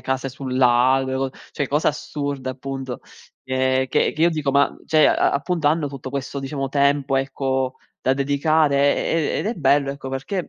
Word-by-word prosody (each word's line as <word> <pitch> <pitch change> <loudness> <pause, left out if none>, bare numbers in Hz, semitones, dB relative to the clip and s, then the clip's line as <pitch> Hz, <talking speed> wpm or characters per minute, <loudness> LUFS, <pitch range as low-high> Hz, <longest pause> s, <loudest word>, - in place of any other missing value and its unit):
case 130 0 -2
sul 130 -1 -5
lago, 130 +1 +4
le 130 - -1
co 135 0 -1 0.2
cioè 140 -3 -2
cosa 150 +2 +2
assurda 140 -3 -4
appunto, 130 -1 -6 0.5
che 130 0 +1
che - - +1
che 155 - -2
io 170 - +6
dico: 155 -4 -1
"Ma 140 +1 +2
cioè, 155 -1 +4
a - - +3
appunto 155 +1 0
hanno 155 0 +1
tutto 135 -2 -7
questo 140 0 -4
diciamo 135 0 -3
tempo 140 0 +1
ecco, 135 -1 -1 0.2
da 130 - +2
dedicare". 145 +2 +2 0.2
E - - -1 0.3
e - - -1
ed - - -3
è 230 - -1
bello 140 -2 +2
ecco, 140 -1 -8
perché 145 +8 -4
135 Hz, 190 wpm, -22 LUFS, 130-145 Hz, 0.5 s, io